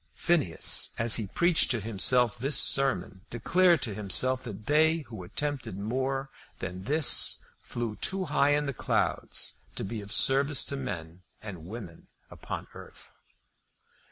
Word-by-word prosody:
Phineas, 155 - +2
as 115 0 +3
he 110 -3 -4
preached 170 - +2
to 120 -1 +1
himself 115 +3 +2
this 135 +3 +1
sermon, 135 -8 +2
declared 170 +7 +2
to 110 - -3
himself 115 +6 0
that 105 -2 -8
they 160 +2 +3
who 110 -9 -10
attempted 135 +2 -4
more 135 +6 -3 0.3
than 95 +1 -7
this 150 +1 +3 0.2
flew 115 -3 -5
too 190 -1 -2
high 145 -1 +2
in 150 0 -1
the 140 - -3
clouds - - -2 0.2
to - - -4
be 105 +3 -5
of 100 0 -11
service 135 +3 +2
to 140 - -3
men 90 -10 -6 0.2
and 90 -6 -9
women 95 -6 -10 0.2
upon - - -7
earth. - - -13
125 Hz, 145 wpm, -28 LUFS, 105-145 Hz, 0.3 s, as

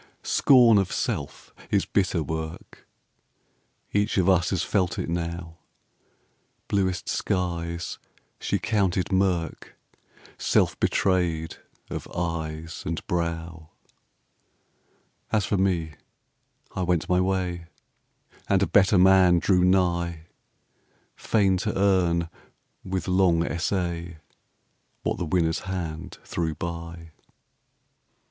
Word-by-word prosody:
Scorn 120 -6 +5
of 95 -2 -1
self - - -4 0.2
is - - +2
bitter 95 -4 0
work, 80 +1 -6 1.1
Each 105 +1 +1
of 95 -1 +3
us 90 -2 +3
has 95 - 0
felt 95 -4 0
it - - -3
now: 85 0 -4 1.1
Bluest 95 -4 0
skies 85 -2 -2 0.4
she - - 0
counted 95 -4 0
mirk, 95 -3 -1 0.6
Self - - +2
betrayed 85 -4 0 0.3
of - - -5
eyes 80 -2 -4
and 80 0 -4
brow; 85 -1 -3 1.6
As 105 -3 +2
for 100 - 0
me, 90 -4 0 0.8
I - - -2
went 90 -2 0
my 90 0 +2
way, 90 -2 -1 0.8
And 100 0 +3
a - - +4
better 100 0 +4
man 90 -1 +6
drew 90 +1 +3
nigh, 85 -3 +1 0.9
Fain 100 -4 +2
to 105 +2 -2
earn, 90 -4 +2 0.6
with 95 -2 -3
long 90 -3 +3
essay, 85 -1 -2 0.9
What - - -1
the 90 - -1
winner's 80 0 +1
hand 90 -1 -5
threw 80 -2 -2
by. 85 0 -6
90 Hz, 105 wpm, -25 LUFS, 85-95 Hz, 1.6 s, man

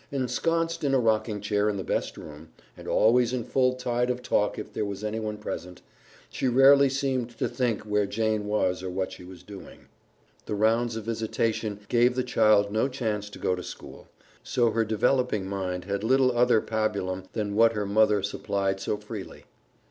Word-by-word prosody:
Ensconced 165 +6 -1
in 135 -2 +2
a - - +4
rocking 110 -2 +1
chair 105 0 +1
in 105 - -2
the 95 - -4
best - - -2
room, 75 +1 -11 0.3
and - - -12
always 120 +2 +3
in 125 -2 -1
full 125 +2 +1
tide 125 -1 -1
of 125 0 -2
talk 105 0 +1
if 105 - -7
there - - -2
was 100 0 -5
anyone 110 0 -3
present, 90 -4 -7 0.4
she - - -2
rarely 135 +2 +6
seemed 130 -4 -2
to - - 0
think 120 -2 -1
where 105 -1 0
Jane 110 0 -1
was 95 -3 0
or 95 - -4
what 95 +1 -3
she - - -11
was 90 0 -12
doing. 100 0 -12 0.6
The 105 - -2
rounds 115 +2 +1
of 110 - -5
visitation 110 -1 -2
gave 120 +2 +3
the 130 - 0
child 105 -4 +3
no 110 +5 +1
chance 110 -6 -3
to - - -11
go - - 0
to 90 - -4
school, - - -10 0.3
so 120 -2 +1
her 115 +1 +1
developing 110 -1 +1
mind 95 -2 -4
had 100 +1 -3
little 130 +1 +3
other 120 -2 +4
pabulum 100 -4 -2
than 105 -2 -2
what 115 +1 +5
her 105 -2 -2
mother 105 0 +3
supplied 100 -1 -2
so 100 +2 -2
freely. 105 -1 -9
110 Hz, 185 wpm, -26 LUFS, 100-125 Hz, 0.6 s, rarely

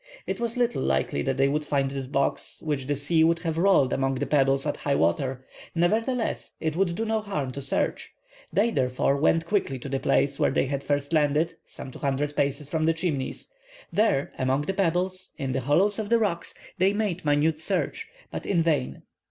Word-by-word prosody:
It - - -3
was 235 0 -1
little 240 -1 +1
likely 70 +1 0
that 135 - -1
they 135 +1 +4
would 150 +2 0
find 140 -2 0
this 135 -1 -4
box, 140 0 -1
which 145 -4 -2
the 145 - +1
sea 160 +3 +2
would 165 +1 +4
have 165 -2 -2
rolled 170 -9 +4
among 135 0 0
the - - -1
pebbles 135 -1 +2
at 145 - -1
high 140 -1 0
water; 130 - 0 0.3
nevertheless, 225 +8 0
it 160 -1 -2
would 175 -1 +1
do 225 - -2
no 220 0 0
harm 150 -11 -3
to 140 - -6
search. 135 - -2 0.4
They, 225 +4 +2
therefore, 130 - +1
went 165 +3 +2
quickly 170 -8 0
to 130 - -8
the 135 0 -1
place 140 0 +1
where - - +3
they 135 - +1
had 140 +1 -3
first 145 +1 -1
landed, 155 +2 +2
some 130 - -9
200 145 +2 -2
paces 140 0 0
from 155 +1 0
the 165 - +4
Chimneys. 160 - -3 0.4
There, 205 -10 +2
among 130 +2 +1
the 195 - -2
pebbles, 185 0 -1
in 135 -1 -2
the 135 +1 -1
hollows 190 - +2
of 210 -2 -3
the 235 - +5
rocks, 200 -7 -1 0.2
they 190 +2 +4
made 205 -4 -1
minute 150 +1 +2
search, 180 +3 -1 0.2
but - - -5
in 170 -4 +2
vain. 155 -6 0
150 Hz, 200 wpm, -26 LUFS, 135-180 Hz, 0.4 s, the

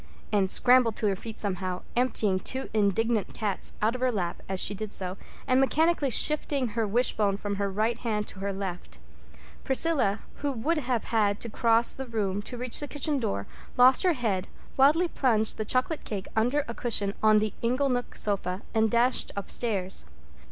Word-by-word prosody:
Anne 200 -2 +3
scrambled 245 +2 +4
to - - -1
her 195 - +1
feet 220 +3 -9
somehow, 185 -2 -3
emptying 220 -6 +1
two 260 +7 -4
indignant 215 +1 0
cats 210 -3 -3
out 220 +2 +3
of 255 - -6
her 255 -1 +2
lap 180 -6 -3
as 190 -1 -2
she 205 - +4
did 210 +1 -6
so, 185 -2 -4 0.3
and 255 0 +3
mechanically 310 +1 +2
shifting 280 0 +3
her 225 0 -1
wishbone 210 -3 +1
from 205 -1 -4
her 200 0 -1
right 215 +4 -1
hand 210 -3 -2
to 190 - -10
her 200 +1 -2
left. 180 - -6 0.7
Priscilla, 265 -7 +2 0.2
who 285 0 -2
would 295 +7 -1
have 250 -4 -1
had 210 -3 +1
to 235 - -6
cross 230 +1 +2
the 265 0 -7
room 205 -4 -2
to 245 +4 -8
reach 250 0 -1
the 290 - -3
kitchen 290 0 0
door, 100 - -2 0.3
lost 255 +1 +6
her 365 -2 +3
head, 215 - -2 0.3
wildly 300 +6 +4
plunged 225 -10 +1
the 215 - -1
chocolate 255 +7 0
cake 200 -3 -5
under 245 +6 +1
a 235 - -5
cushion 205 -5 0
on 215 0 +5
the 215 -1 0
inglenook 250 +1 -1
sofa, 195 -2 -1
and 220 -1 +2
dashed 240 +3 +2
upstairs. 195 - -2
225 Hz, 180 wpm, -27 LUFS, 200-255 Hz, 0.7 s, lost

